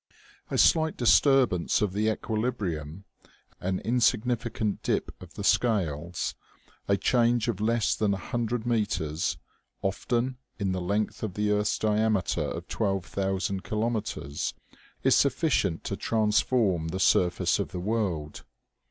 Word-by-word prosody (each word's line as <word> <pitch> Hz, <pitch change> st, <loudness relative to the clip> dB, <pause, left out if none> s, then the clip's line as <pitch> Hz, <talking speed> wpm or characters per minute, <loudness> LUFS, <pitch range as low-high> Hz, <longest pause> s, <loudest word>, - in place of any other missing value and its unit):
A -, -, -1 dB
slight 160 Hz, -1 st, +4 dB
disturbance 125 Hz, -, +4 dB
of 105 Hz, -3 st, 0 dB
the 105 Hz, +2 st, +1 dB
equilibrium, 100 Hz, -8 st, -3 dB, 0.6 s
an 95 Hz, 0 st, -1 dB
in 120 Hz, +4 st, 0 dB
significant 115 Hz, -2 st, 0 dB
dip -, -, -1 dB
of -, -, -12 dB
the -, -, -5 dB
scales, 85 Hz, -7 st, 0 dB, 0.5 s
a 100 Hz, -, +3 dB
change 120 Hz, +1 st, +2 dB
of 105 Hz, -4 st, -2 dB
less 110 Hz, -2 st, +2 dB
than 100 Hz, -2 st, +1 dB
a -, -, -5 dB
hun 120 Hz, +3 st, -3 dB
dred 120 Hz, 0 st, -2 dB
meters, 100 Hz, -9 st, -1 dB, 0.5 s
often, 120 Hz, +6 st, -1 dB, 0.2 s
in 100 Hz, -3 st, -1 dB
the 95 Hz, 0 st, -2 dB
length 100 Hz, +4 st, -1 dB
of 105 Hz, -5 st, -4 dB
the 105 Hz, 0 st, 0 dB
earth's 105 Hz, 0 st, +1 dB
diameter 110 Hz, -3 st, +1 dB
of -, -, -4 dB
twelve 95 Hz, -4 st, -1 dB
thousand 95 Hz, +1 st, -2 dB
kilometers, 110 Hz, -10 st, -2 dB, 0.5 s
is -, -, +5 dB
sufficient 135 Hz, -, +1 dB
to -, -, -3 dB
transform 105 Hz, -5 st, +1 dB
the 95 Hz, +3 st, -3 dB
surface 90 Hz, -2 st, +3 dB
of -, -, -1 dB
the 90 Hz, -, -4 dB
world. 90 Hz, -7 st, -2 dB
105 Hz, 135 wpm, -27 LUFS, 95-115 Hz, 0.6 s, is